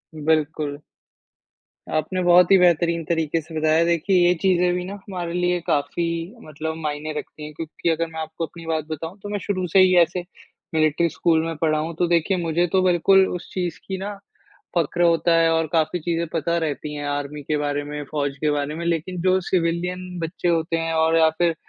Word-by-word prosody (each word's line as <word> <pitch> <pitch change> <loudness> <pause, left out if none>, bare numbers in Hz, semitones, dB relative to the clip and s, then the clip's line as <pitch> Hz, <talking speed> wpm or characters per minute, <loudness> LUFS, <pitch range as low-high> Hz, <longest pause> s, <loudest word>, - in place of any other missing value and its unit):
बिल्कुल। 155 -1 0 1.2
आपने 185 +5 -1
बहुत 175 +1 +5
ही 195 - +8
बेहतरीन 170 -2 +3
तरीके 165 0 0
से 160 +1 -12
बताया। 155 +1 +3
देखिए 170 +3 +1
ये 175 - +5
चीज़ें 180 -2 +3
भी 180 - -2
ना 190 - -6
हमारे 185 -4 -6
लिए 180 0 +1
काफ़ी 145 +4 0 0.4
मतलब 155 +1 -5
मायने 155 -1 -4
रखती 150 - -8
हैं, 150 0 -8
क्योंकि 165 +2 -4
अगर 165 0 0
मैं 160 - -5
आपको 160 +1 -4
अपनी 165 +1 -12
बात 160 -2 -1
बताऊँ 160 +4 -5
तो 205 - -6
मैं 205 0 -2
शुरू 185 -1 -2
से 185 +3 +3
ही 185 -1 +6
ऐसे 175 +2 0 0.5
मिलिट्री 155 +1 +2
स्कूल 160 +1 +1
में 165 0 -3
पढ़ा 155 0 +1
हूँ, 160 +2 -4
तो 175 +2 +1
देखिए 170 +2 +2
मुझे 170 +1 0
तो 190 - +4
बिल्कुल 190 +2 +4
उस 180 - -8
चीज़ 175 -3 -3
की 190 - -3
ना 200 +2 -5 0.6
फ़क्र 170 +1 +1
होता 170 0 +3
है 165 0 +4
और 165 0 +1
काफ़ी 160 +1 +1
चीज़ें 170 +1 -1
पता 170 +1 0
रहती 150 -2 -3
हैं 145 0 -5
आर्मी 145 +1 -4
के 150 +2 -1
बारे 145 0 -1
में, 150 0 -5
फ़ौज 140 -2 -1
के 155 - +1
बारे 145 0 -1
में। 170 +2 -5
लेकिन 170 +2 -2
जो 185 +1 +3
सिविलियन 180 +1 -2
बच्चे 165 +2 -3
होते 165 -1 +1
हैं 165 0 -2
और 160 0 +3
या 160 -1 +6
फिर 170 -1 +2
165 Hz, 200 wpm, -23 LUFS, 155-175 Hz, 1.2 s, ही